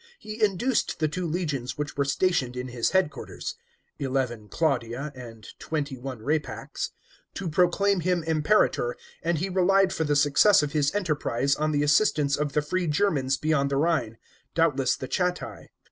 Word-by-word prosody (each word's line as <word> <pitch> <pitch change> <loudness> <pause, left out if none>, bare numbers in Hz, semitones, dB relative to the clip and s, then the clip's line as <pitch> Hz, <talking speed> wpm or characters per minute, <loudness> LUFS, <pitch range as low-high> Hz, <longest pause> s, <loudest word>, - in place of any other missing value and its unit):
He 215 - -5
induced 215 +5 +1
the 155 - +1
two 175 +3 -3
legions 155 -7 -3
which 150 0 -4
were 140 - +1
stationed 140 -4 0
in 125 +1 -4
his 120 -1 0
headquarters 190 -6 -2 0.5
(XI. 140 - -1 0.4
Claudia 135 -2 -1
and 115 -5 -11
XXI. 145 -5 -4 0.2
Rapax) 150 +3 -2 0.5
to 195 - -4
proclaim 180 +4 +2
him 175 0 0
Impera'or, 155 - +2 0.3
and 170 0 0
he 180 +6 -1
relied 190 +1 +3
for 160 - -1
the 145 -1 +1
success 145 +6 +5
of 145 - -2
his 145 -2 +2
enteri 180 -8 -1
>rise 140 +4 +1
on 155 +1 0
the 145 -1 +1
assistance 145 -2 +3
of 145 -1 -2
the 150 - +1
free 180 +3 -1
Germans 150 -5 +1
beyond 155 -3 +1
the 140 - 0
Rhine, 145 -8 0 0.4
doubtless 145 -6 +2
the 130 - -6
Chatti. 180 +3 -2
150 Hz, 160 wpm, -26 LUFS, 140-180 Hz, 0.5 s, success